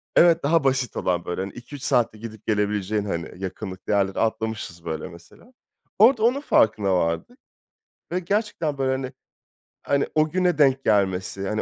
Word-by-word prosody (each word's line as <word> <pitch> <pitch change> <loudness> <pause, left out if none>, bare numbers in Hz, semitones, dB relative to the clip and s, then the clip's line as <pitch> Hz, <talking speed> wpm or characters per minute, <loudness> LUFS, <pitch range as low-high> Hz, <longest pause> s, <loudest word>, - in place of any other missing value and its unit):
Evet, 170 -1 +5
daha 160 +2 +3
basit 130 -2 0
olan 90 -1 -1
böyle, 90 +1 -3
hani, 95 0 -5
2-3 130 +3 -10
saatte 120 -6 +1
gidip 110 -1 -10
gelebileceğin, 105 -1 0
hani, 90 0 -5
yakınlıklı 95 0 -5
yerleri 95 -1 +1
atlamışız, 110 -6 -2
böyle, 80 +2 -4
mesela. 85 - -16 0.5
Orada 225 0 +6
onun 255 +4 +3
farkına 105 - +3
vardık 85 - -2 0.7
ve 180 - 0
gerçekten 185 -5 -1
böyle, 135 -1 0
hani 130 0 -3 0.7
hani, 140 0 0
o 155 0 +3
güne 180 -1 +1
denk 135 -2 +3
gelmesi, 95 -1 0
hani, 110 0 -1
110 Hz, 155 wpm, -24 LUFS, 95-150 Hz, 0.7 s, Orada